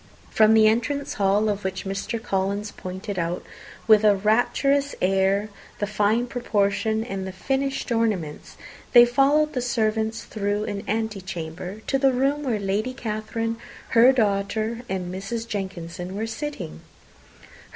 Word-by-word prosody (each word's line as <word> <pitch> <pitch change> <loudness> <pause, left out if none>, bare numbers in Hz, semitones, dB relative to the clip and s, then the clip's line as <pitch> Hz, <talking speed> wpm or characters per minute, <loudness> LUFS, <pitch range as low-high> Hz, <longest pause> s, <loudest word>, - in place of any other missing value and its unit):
From 220 0 +5
the 220 -1 +6
entrance 260 +6 0
hall, 200 +2 +2
of 205 -1 -1
which 190 +1 -3
Mr. 195 +4 -3
Collins 200 -1 -2
pointed 185 +1 -6
out, 170 +1 -2 0.4
with 215 -1 +6
a 210 -1 +6
rapturous 260 +7 +2
air, 195 +2 +2 0.3
the 205 - -1
fine 210 +3 +1
proportion 220 -2 0
and 195 -4 -4
finished 270 +5 -2
ornaments, 210 -10 -1 0.4
they 240 -1 +10
followed 285 +5 +3
the 250 - -1
servants 220 -2 0
through 205 0 -2
an 200 -1 -4
antechamber 190 -3 -4
to 270 - 0
the 270 0 +4
room 275 +3 +1
where 250 -6 0
Lady 205 +5 -2
Catherine, 225 0 -3 0.3
her 240 +3 +7
daughter, 220 0 0
and 180 -1 -3
Mrs. 225 +5 -4
Jenkinson 185 -3 -5
were 215 +2 -2
sitting. 295 +6 -6
215 Hz, 135 wpm, -24 LUFS, 195-235 Hz, 0.4 s, they